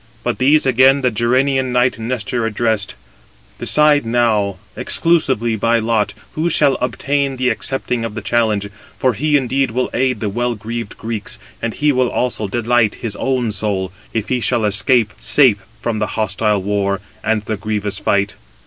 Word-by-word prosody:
But -, -, -2 dB
these 145 Hz, +4 st, +4 dB
again 130 Hz, +2 st, +4 dB
the 125 Hz, -1 st, +2 dB
Gerenian 130 Hz, +3 st, +1 dB
knight 125 Hz, -1 st, +2 dB
Nestor 120 Hz, 0 st, -2 dB
addressed: 110 Hz, -2 st, -1 dB, 0.6 s
"Decide 150 Hz, -1 st, +3 dB
now, 115 Hz, -4 st, +1 dB, 0.2 s
exclusively 130 Hz, -9 st, +2 dB
by 115 Hz, +2 st, +2 dB
lot, 115 Hz, -2 st, 0 dB, 0.2 s
who 160 Hz, +3 st, 0 dB
shall 140 Hz, -4 st, +3 dB
obtain 135 Hz, +2 st, -1 dB
[the 125 Hz, 0 st, +1 dB
accepting 125 Hz, 0 st, -2 dB
of 115 Hz, -2 st, -5 dB
the 110 Hz, -, -4 dB
challenge]; 105 Hz, -3 st, 0 dB, 0.3 s
for 130 Hz, -1 st, +2 dB
he 150 Hz, +7 st, +2 dB
indeed 135 Hz, 0 st, 0 dB
will 125 Hz, +3 st, -2 dB
aid 130 Hz, +1 st, 0 dB
the 110 Hz, -, -2 dB
well 120 Hz, +4 st, -1 dB
greaved 115 Hz, +1 st, -6 dB
Greeks; 110 Hz, -2 st, -4 dB, 0.2 s
and 115 Hz, -1 st, -3 dB
he 150 Hz, 0 st, +2 dB
will 130 Hz, -2 st, +1 dB
also 115 Hz, -4 st, -1 dB
delight 115 Hz, +1 st, +1 dB
his 105 Hz, -3 st, -3 dB
own 125 Hz, -4 st, 0 dB
soul, 95 Hz, -2 st, -2 dB, 0.2 s
if 110 Hz, -2 st, -3 dB
he 125 Hz, -, +1 dB
shall 120 Hz, -1 st, +1 dB
escape 110 Hz, +1 st, +2 dB
safe 125 Hz, -9 st, +3 dB, 0.2 s
from 115 Hz, -2 st, -2 dB
the 105 Hz, -, 0 dB
hostile 105 Hz, -1 st, 0 dB
war 100 Hz, 0 st, 0 dB, 0.2 s
and 110 Hz, -1 st, 0 dB
the 110 Hz, 0 st, -3 dB
grievous 105 Hz, -1 st, -3 dB
fight." 100 Hz, 0 st, +1 dB
115 Hz, 165 wpm, -18 LUFS, 105-130 Hz, 0.6 s, these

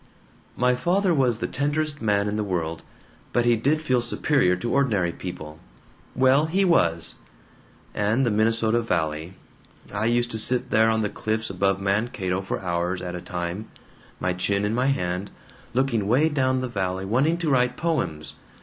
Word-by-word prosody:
"My 125 Hz, +1 st, +3 dB
father 180 Hz, +8 st, +1 dB
was 130 Hz, -6 st, +2 dB
the -, -, -3 dB
tenderest 145 Hz, +1 st, -2 dB
man 105 Hz, -2 st, +1 dB
in 105 Hz, -, -2 dB
the 105 Hz, -, -1 dB
world, 85 Hz, -4 st, -3 dB, 0.5 s
but 120 Hz, -1 st, +2 dB
he 120 Hz, -1 st, +4 dB
did 145 Hz, +8 st, 0 dB
feel 130 Hz, -5 st, +2 dB
superior 125 Hz, -6 st, +2 dB
to 95 Hz, +6 st, -3 dB
ordinary 110 Hz, -11 st, +2 dB
people. 80 Hz, -4 st, -8 dB, 0.6 s
Well, 130 Hz, +4 st, +4 dB
he 190 Hz, +4 st, +1 dB
was! 85 Hz, -, +2 dB, 0.8 s
And 110 Hz, +6 st, +1 dB
the 115 Hz, -, +1 dB
Minnesota 115 Hz, +2 st, +2 dB
Valley 85 Hz, -4 st, -2 dB, 0.6 s
I 105 Hz, +2 st, -1 dB
used 120 Hz, 0 st, +1 dB
to 110 Hz, -, -1 dB
sit 125 Hz, +3 st, +2 dB
there 110 Hz, 0 st, +4 dB
on 110 Hz, 0 st, +1 dB
the 105 Hz, -, -1 dB
cliffs 110 Hz, 0 st, -3 dB
above 95 Hz, +1 st, +1 dB
Mankato 100 Hz, -2 st, -1 dB
for 95 Hz, -, -4 dB
hours 90 Hz, 0 st, -2 dB
at 90 Hz, -1 st, -5 dB
a 90 Hz, -, -5 dB
time, 90 Hz, +4 st, -4 dB, 0.5 s
my 90 Hz, -, 0 dB
chin 100 Hz, +3 st, 0 dB
in 105 Hz, -, -1 dB
my 125 Hz, +3 st, +1 dB
hand, 90 Hz, -7 st, -1 dB, 0.5 s
looking 120 Hz, -6 st, +1 dB
way 135 Hz, +8 st, +3 dB
down 130 Hz, -3 st, +1 dB
the 130 Hz, -, -2 dB
valley, 95 Hz, -4 st, -2 dB
wanting 135 Hz, +11 st, +2 dB
to 165 Hz, -4 st, -1 dB
write 125 Hz, -1 st, +2 dB
poems. 85 Hz, -, -2 dB
110 Hz, 170 wpm, -24 LUFS, 95-130 Hz, 0.8 s, he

